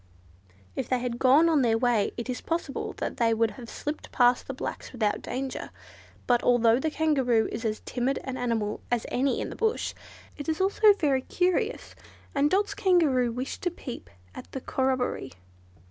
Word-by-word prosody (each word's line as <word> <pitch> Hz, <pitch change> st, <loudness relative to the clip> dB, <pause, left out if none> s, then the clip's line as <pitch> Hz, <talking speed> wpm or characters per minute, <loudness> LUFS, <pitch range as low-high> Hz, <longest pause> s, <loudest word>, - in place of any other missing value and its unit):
If -, -, -3 dB
they 255 Hz, -, +2 dB
had 245 Hz, -1 st, -3 dB
gone 275 Hz, +6 st, +6 dB
on 315 Hz, -4 st, +3 dB
their 230 Hz, -3 st, +3 dB
way 235 Hz, -3 st, +2 dB
it 235 Hz, -, -4 dB
is 250 Hz, -1 st, -3 dB
possible 330 Hz, -4 st, -3 dB
that -, -, -4 dB
they 230 Hz, -2 st, +3 dB
would 225 Hz, -1 st, +2 dB
have 240 Hz, -3 st, -10 dB
slipped 295 Hz, +1 st, -5 dB
past 245 Hz, 0 st, +3 dB
the 270 Hz, -, -4 dB
blacks -, -, -5 dB
without 215 Hz, -4 st, 0 dB
danger. 265 Hz, 0 st, -4 dB, 0.6 s
But 240 Hz, -1 st, +3 dB
although 235 Hz, -1 st, +4 dB
the 315 Hz, -, 0 dB
Kangaroo 270 Hz, -8 st, +2 dB
is 225 Hz, -, -5 dB
as 215 Hz, -1 st, -2 dB
timid 255 Hz, +2 st, -1 dB
an 265 Hz, -1 st, -4 dB
animal 230 Hz, -4 st, -1 dB
as 240 Hz, -2 st, 0 dB
any 265 Hz, +2 st, +1 dB
in -, -, -4 dB
the -, -, -7 dB
bush, 450 Hz, 0 st, 0 dB, 0.4 s
it 290 Hz, +2 st, -5 dB
is 315 Hz, -, -1 dB
also 405 Hz, +3 st, +5 dB
very 285 Hz, -9 st, +1 dB
curious, 370 Hz, -, -1 dB, 0.4 s
and 285 Hz, +1 st, +3 dB
Dot's 405 Hz, +3 st, +1 dB
Kangaroo 325 Hz, -, +3 dB
wished 250 Hz, +3 st, -5 dB
to 355 Hz, -, +1 dB
peep 270 Hz, -7 st, -8 dB, 0.2 s
at -, -, -10 dB
the 265 Hz, -, -4 dB
corroboree. 260 Hz, -, -1 dB
260 Hz, 180 wpm, -27 LUFS, 240-315 Hz, 0.6 s, gone